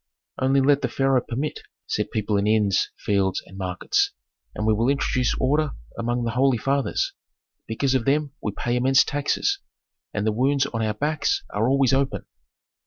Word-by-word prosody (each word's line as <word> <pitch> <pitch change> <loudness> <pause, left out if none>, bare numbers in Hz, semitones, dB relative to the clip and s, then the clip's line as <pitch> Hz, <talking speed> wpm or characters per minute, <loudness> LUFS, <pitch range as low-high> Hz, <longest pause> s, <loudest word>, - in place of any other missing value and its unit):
"Only 135 +1 +3
let 140 +1 +3
the - - 0
pharaoh 135 -2 +2
permit," 135 +6 -4 0.3
said - - -2
people 105 -1 -1
in 100 +1 +1
inns, 105 -3 +2
fields 95 -2 0
and 95 - -14
markets, 90 -2 0 0.4
"and 105 - -2
we 110 - +4
will 115 +4 +1
introduce 130 -3 +1
order 150 +3 +1 0.2
among 120 +1 -1
the 115 - -1
holy 130 +1 +3
fathers. 135 +4 0 0.5
Because 130 +4 0
of 130 -4 +1
them 145 0 +1
we 105 - -2
pay 120 +4 -2
immense 130 +2 +5
taxes, 150 - 0 0.5
and 105 0 -2
the 110 - +2
wounds 135 +5 +2
on 115 - -3
our 110 -1 -1
backs 150 +5 0
are 110 +4 +1
always 135 -1 +3
open." 135 0 0
130 Hz, 175 wpm, -24 LUFS, 110-140 Hz, 0.5 s, immense